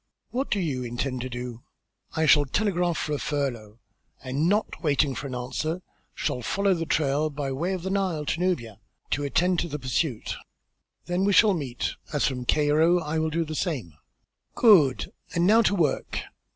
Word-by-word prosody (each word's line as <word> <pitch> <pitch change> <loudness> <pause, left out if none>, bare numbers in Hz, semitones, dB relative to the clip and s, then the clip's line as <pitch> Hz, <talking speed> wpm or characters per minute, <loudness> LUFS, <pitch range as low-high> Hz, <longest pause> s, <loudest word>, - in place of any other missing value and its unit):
What 260 +3 -2
do 205 - +1
you 140 -8 -1
intend 125 +2 -3
to 130 - -4
do?" 120 -1 -6 0.5
"I 160 - +2
shall 145 -1 +6
telegraph 175 +1 0
for 150 - -2
a 145 - -1
furlough, 125 -8 -3 0.5
and 140 +6 0
not 210 +2 0
waiting 145 -3 +2
for 135 +3 -5
an 130 - -5
answer, 155 +8 -3 0.3
shall 125 - -2
follow 200 - +1
then 165 -2 -3
trail 150 0 +1
by 140 -2 -4
way 170 +8 -1
of 180 -3 -4
the 190 - -2
Nile 185 -6 0
to 165 - -1
Nubia, 120 - -1 0.3
to 145 - 0
attend 175 +5 +2
to - - -1
the 150 - -4
pursuit." 130 -2 -2 0.7
"Then 180 +2 0
we 200 0 +3
shall 210 +1 +6
meet, 135 -8 -3 0.2
as 145 - +1
from 125 -2 -2
Cairo 155 +5 +3
I 160 -1 -3
shall 160 0 +1
do 165 +1 -1
the 155 - -6
same." 145 - -2 0.6
"Good! 170 - +5 0.2
And 170 0 +3
now 220 +4 +6
to 205 - +2
work!" 160 -7 0
150 Hz, 185 wpm, -26 LUFS, 130-175 Hz, 0.7 s, shall